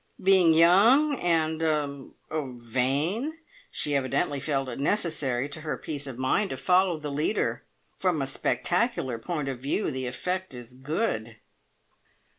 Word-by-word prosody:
Being 185 -4 +6
young 220 - +6
and 160 -2 +1
er 145 -4 -1 0.5
vain, 140 - -1 0.3
she 145 -1 -2
evidently 140 +1 0
felt 135 -1 -1
it 125 - -6
necessary 145 -6 0
to 155 - -9
her 155 -1 -3
peace 145 -2 -6
of 130 -3 -7
mind 160 +11 +1
to - - -4
follow 180 -2 +3
the 150 -1 -5
leader. 150 +9 -1 0.3
From 180 -4 +1
a 135 - 0
spectacular 135 - -1
point 150 +4 -3
of 130 -3 -4
view 140 +8 -1
the 130 -2 -3
effect 180 +4 -3
is 120 0 -10
good." 130 - -2
150 Hz, 140 wpm, -27 LUFS, 130-180 Hz, 0.5 s, Being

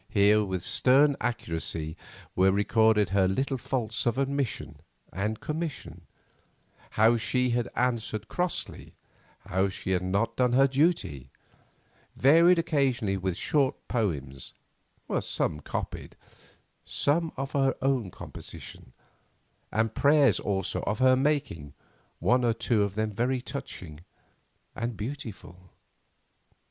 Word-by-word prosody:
Here 105 0 +4
with 95 -3 -3
stern 140 +3 +4
accuracy 80 -8 -3 0.4
were 95 +1 +4
recorded 105 0 +3
her 95 0 +3
little 135 +7 -1
faults 115 -4 -2
of 120 +1 +1
omission 140 -2 -2 0.3
and 105 +4 -2
commission—how 145 -6 -3
she 125 +4 0
had 120 0 0
answered 115 -3 -1
crossly; 180 -1 -3 0.5
how 95 +2 0
she 95 0 -5
had 90 -1 +2
not 100 +5 -1
done 125 -1 +2
her 135 +2 +6
duty; 130 - 0 0.9
varied 165 +6 +6
occasionally 135 -10 +1
with 95 -2 -2
short 140 -3 +1
poems, 70 - -3 0.6
some 75 - -2
copied, - - -6 0.7
some 160 +3 0
of 135 +1 -4
her 135 -1 +1
own 130 -7 +1
composition, 65 - -10 0.8
and 110 +1 0
prayers 145 -1 +4
also 95 -2 -2
of 105 - 0
her 130 +1 +5
making, 135 - -1 0.4
one 125 +8 +2
or 120 -1 +3
two 110 -1 0
of 100 -1 -1
them 110 0 -1
very 125 +5 0
touching 90 - -7 0.8
and 115 -2 -3
beautiful. 105 - -8
115 Hz, 115 wpm, -28 LUFS, 95-135 Hz, 0.9 s, her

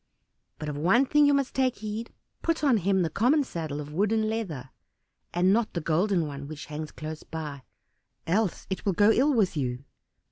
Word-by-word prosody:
But 150 - -6
of 150 - -3
one 225 - +4
thing 295 +2 +4
you 285 - +4
must 275 -2 0
take 260 -2 +1
heed; 215 +2 -5 0.3
put 330 -2 0
on 270 -6 +5
him 190 -1 +2
the 165 - 0
common 260 - +3
saddle 160 - -5
of 150 0 -7
wood 200 +6 +1
and 220 -1 +2
leather, 170 - -4 0.6
and 180 +2 +3
not 230 0 +1
the - - +1
golden 170 +2 +1
one, 140 -1 -6
which 150 -1 -7
hangs 150 +1 -6
close 155 0 -7
by, 150 -4 -6 0.6
else 195 +2 0
it 190 - -3
will 195 - +1
go 205 +4 +5
ill 270 +6 +3
with 215 -10 +2
you." 125 -3 -2
190 Hz, 200 wpm, -27 LUFS, 155-225 Hz, 0.6 s, on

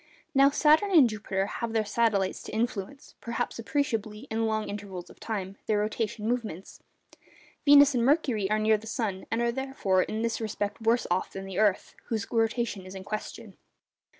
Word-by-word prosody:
Now, 275 0 +6
Saturn 310 +7 +4
and 320 -9 +7
Jupiter 205 -3 -2
have 230 +2 -4
their 220 -1 +1
satellites 205 -3 +1
to - - -9
influence 225 +3 -3
(perhaps 235 0 -3
appreciably 225 -5 -2
in 225 0 0
long 215 -1 -1
intervals 200 -3 -7
of - - -18
time) 200 -3 -4
their 215 - +2
rotation 215 +1 -2
movements. 220 -7 -3 0.9
Venus 285 0 +8
and 240 -2 +1
Mercury 250 -8 +2
are 215 - +2
near 215 0 +3
the 220 - -12
sun, 210 -4 -3
and 225 +2 0
are 235 - +2
therefore 255 -8 0
in 220 +4 -2
this 230 0 -1
respect 210 -1 -3
worse 230 +2 +2
off 180 +1 0
than 195 0 -6
the 195 0 -4
earth, 205 -3 +1
whose 220 -3 -2
rotation 225 -3 0
is 185 - -9
in 190 - -7
question. 210 +2 -6
220 Hz, 180 wpm, -28 LUFS, 205-235 Hz, 0.9 s, Venus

